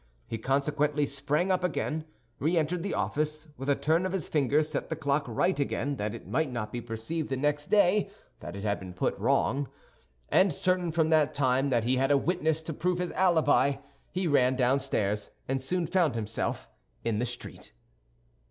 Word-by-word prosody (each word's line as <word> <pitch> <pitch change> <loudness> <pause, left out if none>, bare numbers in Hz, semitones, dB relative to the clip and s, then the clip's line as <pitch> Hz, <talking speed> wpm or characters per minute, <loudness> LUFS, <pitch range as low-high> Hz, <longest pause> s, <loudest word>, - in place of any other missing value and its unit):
He 115 - -5
consequently 145 +3 +1
sprang 145 +6 0
up 185 -1 +1
again, 155 -3 -1 0.3
re 165 +5 +1
entered 165 +2 0
the 195 - -2
office, 150 +10 -2
with 135 +2 -5
a 140 - +4
turn 160 +5 +1
of 185 0 -2
his 190 -4 -2
finger 145 0 +2
set 155 -1 -3
the 160 - -1
clock 145 -1 0
right 160 +10 +1
again, 140 0 -1
that 105 +2 -2
it 115 - -10
might 160 -4 0
not 105 -3 -4
be 120 - -4
perceived 120 +8 -4
the 135 - -1
next 145 +2 0
day 205 -1 +4 0.3
that 85 - -8
it 100 - -6
had 100 -1 0
been 95 -2 -9
put - - 0
wrong, 135 +4 +1 0.6
and 190 0 +4
certain 180 +2 0
from 160 0 +1
that 155 -2 +3
time 135 0 +2
that 120 -4 +2
he 125 +3 +2
had 135 +1 +2
a 145 - +5
witness 160 0 0
to 160 - -4
prove 180 +4 0
his 180 0 -2
alibi, 160 -6 +3 0.4
he 185 +1 -1
ran 130 -4 +3
downstairs 125 -6 0 0.2
and 135 0 -1
soon 175 +6 -1
found 165 -5 +2
himself 110 -1 -2 0.4
in 110 -2 0
the 120 - +1
street. 120 0 -8
145 Hz, 190 wpm, -29 LUFS, 125-165 Hz, 0.6 s, a